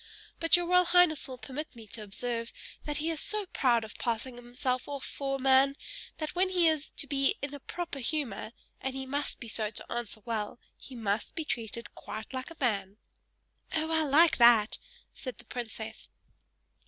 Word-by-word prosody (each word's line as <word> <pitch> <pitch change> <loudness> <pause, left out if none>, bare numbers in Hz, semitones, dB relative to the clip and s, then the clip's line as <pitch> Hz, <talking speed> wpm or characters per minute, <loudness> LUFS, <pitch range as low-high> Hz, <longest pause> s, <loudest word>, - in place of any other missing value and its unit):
But 330 +1 +6
your 350 - 0
royal 360 +1 +5
highness 345 -3 +5
will 260 -1 -7
permit 280 +3 -6
me 225 -2 -10
to 220 - -6
observe, 230 +3 -3 0.3
that 295 -1 -2
he 315 +2 0
is 315 - -2
so 425 -1 0
proud 245 -9 +2
of 215 - -9
passing 240 +1 -1
himself 250 +1 -2
off 280 -2 -4
for 275 -1 -2
a - - -4
man, 270 +1 +5 0.4
that 310 -1 -3
when 370 +1 +3
he 355 -3 +4
is 310 -2 +1
to - - 0
be 275 -1 +2
in 285 0 -3
a 285 - -6
proper 340 0 -5
humor 250 -6 -1 0.3
and 265 0 -2
he 265 0 -3
must 285 +2 -2
be 235 - -7
so 215 -1 +1
to - - -5
answer 235 -3 -4
well 225 -1 -2 0.2
he 265 - -11
must 215 -2 -1
be 320 - -2
treated 235 -3 -3
quite 220 +4 -7
like 260 +2 -4
a 330 - -12
man." 200 -6 0 0.8
"Oh! 320 0 0
I 320 -1 +3
like 310 +3 +6
that!" 235 -3 +6 0.3
said 255 -4 -7
the - - -13
princess. 225 -2 -6
265 Hz, 190 wpm, -31 LUFS, 235-310 Hz, 0.8 s, But